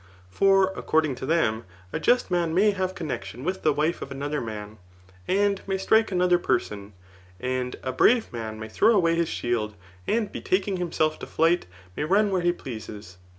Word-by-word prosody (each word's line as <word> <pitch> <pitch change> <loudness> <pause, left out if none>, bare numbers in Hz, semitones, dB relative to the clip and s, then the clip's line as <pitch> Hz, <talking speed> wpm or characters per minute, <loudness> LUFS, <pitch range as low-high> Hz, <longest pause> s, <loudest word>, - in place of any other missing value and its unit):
] 90 0 -27
For 195 - +4
according 155 -3 +1
to 130 - -6
them, 120 -9 +1 0.3
a - - -1
just 245 -5 +2
num 170 -2 +1
may 205 +3 +5
have 185 -1 -2
connexion 125 - -5
with 185 +4 -2
the 155 - +3
wife 155 +4 0
of - - -6
another 145 +2 -3
man, 105 -2 -7 0.5
and 200 0 +2
may 195 0 0
strike 220 +3 +3
another 180 -1 +3
person, 105 -10 -2 0.5
and 125 +1 -2
a 130 - -2
brave 225 - +3
man 110 -2 -5
may 110 - -6
throw 215 - +3
away 170 -4 +3
his 165 -1 0
shield, 110 -3 -2 0.3
and 220 -2 0
betaking 190 0 -1
himself 160 -3 0
to - - -7
flight 165 - +2 0.3
may - - -2
run 200 +6 +3
where 185 -2 +1
he 175 0 +3
pleases. 110 - -8
160 Hz, 185 wpm, -25 LUFS, 120-190 Hz, 0.5 s, may